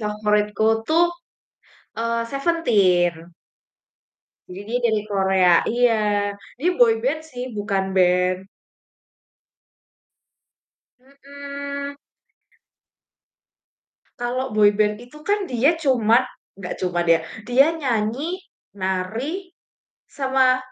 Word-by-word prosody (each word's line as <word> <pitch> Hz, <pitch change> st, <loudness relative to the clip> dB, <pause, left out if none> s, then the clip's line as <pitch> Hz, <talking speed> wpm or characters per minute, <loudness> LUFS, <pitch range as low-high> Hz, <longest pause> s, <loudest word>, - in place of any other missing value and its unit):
favoritku 210 Hz, 0 st, 0 dB, 0.2 s
tuh, 330 Hz, +2 st, +4 dB, 1.0 s
eee, 230 Hz, 0 st, -1 dB
Seventeen. 185 Hz, -, +1 dB, 1.2 s
Jadi 180 Hz, +2 st, -8 dB
dia 240 Hz, +3 st, -1 dB
dari 220 Hz, -3 st, +2 dB
Korea, 190 Hz, -4 st, +3 dB
iya, 210 Hz, -4 st, +1 dB, 0.2 s
jadi 340 Hz, +7 st, +1 dB
boyband 245 Hz, +4 st, +2 dB
sih, 250 Hz, -6 st, -8 dB
bukan 195 Hz, -2 st, -2 dB
band. 180 Hz, 0 st, +2 dB, 2.6 s
Mhm. 280 Hz, +1 st, -8 dB, 2.2 s
Kalau 250 Hz, +1 st, -3 dB
boyband 210 Hz, 0 st, +3 dB
itu 300 Hz, +5 st, -14 dB
kan 410 Hz, -2 st, 0 dB
dia 260 Hz, +7 st, +2 dB
cuma 250 Hz, -4 st, +3 dB, 0.3 s
nggak 180 Hz, -2 st, -5 dB
cuman 175 Hz, -1 st, -1 dB
dia, 165 Hz, -1 st, +5 dB, 0.3 s
dia 260 Hz, +3 st, +5 dB
nyanyi, 270 Hz, +2 st, -2 dB, 0.4 s
nari, 225 Hz, -, -3 dB, 0.6 s
sama 265 Hz, -2 st, +2 dB
230 Hz, 80 wpm, -22 LUFS, 200-275 Hz, 2.6 s, dia